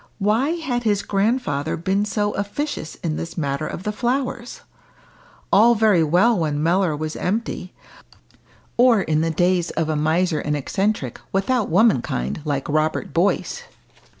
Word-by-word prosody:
Why 225 +9 +1
had 265 -8 -2
his 210 -4 +1
grandfather 195 - 0
been 190 +5 0
so 210 0 -1
officious 205 - -4
in 155 -3 -1
this 165 +1 -6
matter 140 -1 -2
of 180 - -6
the 210 - -1
flowers? 245 +1 -2 0.9
All 235 +4 +6
very 210 -6 +4
well 185 +8 +3
when 150 -2 -1
Mellor 175 -1 +2
was 155 +1 -4
empty, 195 -2 -3 1.0
or 240 -3 +5
in 155 0 +1
the 165 - 0
days 175 +2 +1
of 160 -1 -2
a 155 - 0
miser 160 +2 +1
and 150 0 -1
eccentric, 190 - -2
without 215 +4 0
womankind, 130 - +1
like 140 -2 -2
Robert 155 +1 -1
Boyce. 200 - 0
185 Hz, 145 wpm, -22 LUFS, 155-220 Hz, 1.0 s, All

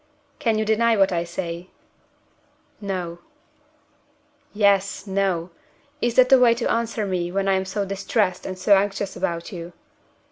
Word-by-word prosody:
"Can 225 -2 +1
you 215 - 0
deny 225 +1 +2
what 195 -1 +4
I 170 -1 0
say?" 170 0 -5 1.1
"No." 180 -4 -4 1.3
"'Yes!' 200 -1 +2
'No!' 190 -3 -1 0.5
Is 240 -1 0
that 255 0 +6
the 265 - +7
way 240 -2 +5
to 235 - -1
answer 230 -2 -1
me 180 -3 -2
when 195 +1 -1
I 195 - +3
am 190 0 0
so 200 +1 -2
distressed 195 0 -1
and 185 -1 -5
so 200 +2 +4
anxious 195 0 -1
about 170 0 -3
you?" 175 -2 -8
195 Hz, 150 wpm, -23 LUFS, 180-215 Hz, 1.3 s, the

